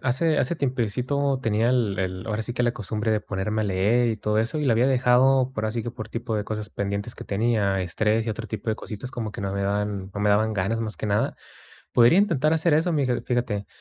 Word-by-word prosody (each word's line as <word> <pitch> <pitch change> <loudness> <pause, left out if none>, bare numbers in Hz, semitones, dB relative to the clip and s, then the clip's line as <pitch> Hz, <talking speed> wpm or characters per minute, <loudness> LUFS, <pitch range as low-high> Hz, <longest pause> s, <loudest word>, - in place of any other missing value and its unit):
hace 145 +5 +1
hace 145 +4 +1
tiempecito 130 +1 -1
tenía 110 +1 +1
el 115 -6 +1
el, 95 -1 -3
ahora 110 0 -2
sí 120 - -4
que, 125 - -1
la 120 - +3
costumbre 110 0 -3
de 110 -1 +2
ponerme 105 +2 -2
a - - -1
leer 105 +5 +2
y 110 - -1
todo 105 0 0
eso, 115 +8 0
y 150 - -1
la 120 - +4
había 120 +3 +3
dejado, 130 0 +4
por 110 -3 -2
así 115 +1 -2
que 120 - -4
por 110 - -8
tipo 115 -1 -3
de 105 - -2
cosas 105 -1 -5
pendientes 100 +3 -3
que - - -8
tenía, 100 -2 +1
estrés, 105 +5 0
y - - 0
otro 110 +1 -5
tipo 110 0 -6
de 110 - -1
cositas, 110 +4 -7
como 115 -4 -4
que - - -7
no 100 -1 -2
me 100 0 -2
daban 100 -1 -2
no 100 - -3
me 105 0 +3
daban 110 +2 +3
ganas, 105 +3 -1
más 110 -1 -3
que - - -4
nada, 105 0 +1 0.6
podría 120 +9 +6
intentar 160 -7 +2
hacer 160 0 +3
eso, 165 +3 +2
mira 135 -5 +1
fíjate, 115 -5 -1
110 Hz, 245 wpm, -25 LUFS, 105-125 Hz, 0.6 s, podría